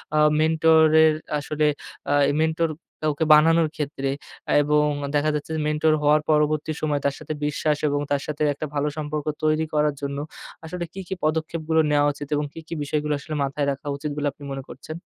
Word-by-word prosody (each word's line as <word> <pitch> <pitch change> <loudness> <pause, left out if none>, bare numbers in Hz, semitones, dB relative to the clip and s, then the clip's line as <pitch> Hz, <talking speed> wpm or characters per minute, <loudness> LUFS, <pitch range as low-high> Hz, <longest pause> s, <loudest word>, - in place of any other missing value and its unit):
আ - - +4 0.2
মেন্টর-এর 160 0 +5 0.3
আসলে 150 +1 -1 0.5
আ - - +3 0.3
মেন্টর 160 +1 +1 0.3
কাউকে 155 +1 0
বানানোর 160 +1 +5
ক্ষেত্রে। 140 -2 -3 0.5
এবং 150 +1 +3 0.3
দেখা 150 +1 +2
যাচ্ছে 150 +2 -4
যে, 155 - -2
মেন্টর 150 +1 +2
হওয়ার 150 +1 +4
পরবর্তী 155 0 +2
সময় 150 -2 0
তার 140 -1 +1
সাথে 155 0 -5
বিশ্বাস 150 0 0
এবং 145 0 0
তার 140 -1 +1
সাথে 150 0 -2
একটা 155 - -5
ভালো 145 +1 +1
সম্পর্ক 150 -1 -3 0.2
তৈরি 155 +1 +2
করার 150 -1 +2
জন্য 140 0 -3 0.5
আসলে, 175 +2 -5
কী, 195 - -7
কী 190 - -3
পদক্ষেপগুলো 160 +1 0
নেয়া 145 0 +4
উচিত? 145 0 -8
এবং 145 0 0
কি, - - -8
কি - - -6
বিষয়গুলো 150 +1 -1
আসলে 155 +1 -6
মাথায় 140 +1 -1
রাখা 140 +2 -7
উচিত 150 +1 -4
বলে 145 - 0
আপনি 145 - -16
মনে 135 -1 -5
করছেন? 155 +5 -8
150 Hz, 185 wpm, -24 LUFS, 145-155 Hz, 0.5 s, মেন্টর-এর